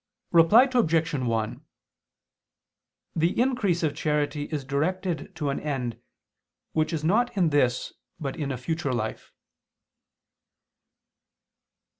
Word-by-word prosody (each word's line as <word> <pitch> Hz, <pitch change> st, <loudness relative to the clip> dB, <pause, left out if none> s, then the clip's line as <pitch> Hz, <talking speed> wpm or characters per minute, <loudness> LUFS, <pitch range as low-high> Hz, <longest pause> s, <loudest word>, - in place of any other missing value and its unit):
Reply 170 Hz, +8 st, +7 dB
Obj. 165 Hz, -10 st, +2 dB
1: 115 Hz, -5 st, -1 dB, 1.5 s
The 170 Hz, +5 st, +1 dB
increase 235 Hz, -10 st, +1 dB
of 150 Hz, -2 st, +1 dB
charity 150 Hz, -1 st, -1 dB
is 145 Hz, -4 st, -4 dB
directed 165 Hz, +5 st, -2 dB
to 145 Hz, -3 st, -1 dB
an 140 Hz, -, -2 dB
end, 125 Hz, -6 st, -3 dB, 0.7 s
which 155 Hz, +1 st, 0 dB
is 160 Hz, -2 st, -2 dB
not 215 Hz, +7 st, +2 dB
in 175 Hz, -4 st, +3 dB
this, 130 Hz, -4 st, +1 dB, 0.3 s
but 140 Hz, -4 st, -4 dB
in 145 Hz, -3 st, -3 dB
a 130 Hz, -, -3 dB
future 145 Hz, +2 st, -2 dB
life. 110 Hz, -2 st, -4 dB
155 Hz, 110 wpm, -26 LUFS, 135-170 Hz, 1.5 s, Reply